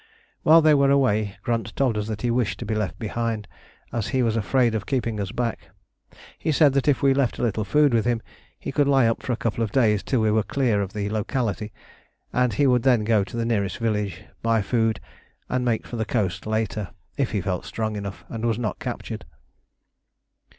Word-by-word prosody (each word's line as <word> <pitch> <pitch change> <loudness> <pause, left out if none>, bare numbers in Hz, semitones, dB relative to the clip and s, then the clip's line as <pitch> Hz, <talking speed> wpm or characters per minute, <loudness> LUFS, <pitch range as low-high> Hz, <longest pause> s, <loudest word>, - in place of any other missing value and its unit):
While 160 +1 +6
they 155 -1 +6
were 140 -1 +4
away 110 -7 +2
Grunt 115 -2 -2
told 130 -5 +1
us 105 0 -2
that 110 0 -5
he 120 - +1
wished 120 -3 0
to 120 - -6
be 110 - -2
left 105 -2 -2
behind, 110 -2 -3 0.5
as 115 -3 -1
he 130 -2 +1
was 115 -2 +1
afraid 120 +2 +2
of 110 -2 -3
keeping 115 -5 -1
us 100 -1 -3
back. 120 -1 -3 0.7
He 160 - 0
said 145 -2 +5
that 140 0 +1
if 145 -2 +2
we 135 -1 +5
left 135 -3 +1
a - - -3
little 110 -2 0
food 145 +5 +3
with 115 -2 +3
him 120 -1 +1 0.4
he - - -5
could 145 -1 +2
lie 135 -3 +4
up 115 0 +1
for - - -3
a - - +2
couple 115 0 -1
of 105 - -3
days 110 -5 +3
till 130 - 0
we 110 -1 +3
were 110 +1 +3
clear 115 -3 +1
of 95 -1 -4
the 105 -1 -2
locality, 110 -1 -2 0.6
and 125 -2 +2
he 140 +8 +2
would 125 -2 +4
then 125 -3 +3
go 110 -2 +3
to 110 - -7
the 115 - 0
nearest 100 -5 0
village, 105 -6 -2 0.2
buy 115 -2 +2
food, 115 +1 +1 0.5
and 125 0 0
make 120 -3 0
for 120 - -6
the 110 - 0
coast 110 -4 -2
later, 110 -2 -1 0.3
if 135 -3 0
he 105 - -1
felt 90 -1 -2
strong 110 -1 -3
enough 100 -1 -6
and 115 0 -6
was 115 -2 +1
not 110 -5 -3
captured. - - -5
115 Hz, 220 wpm, -24 LUFS, 105-125 Hz, 0.7 s, While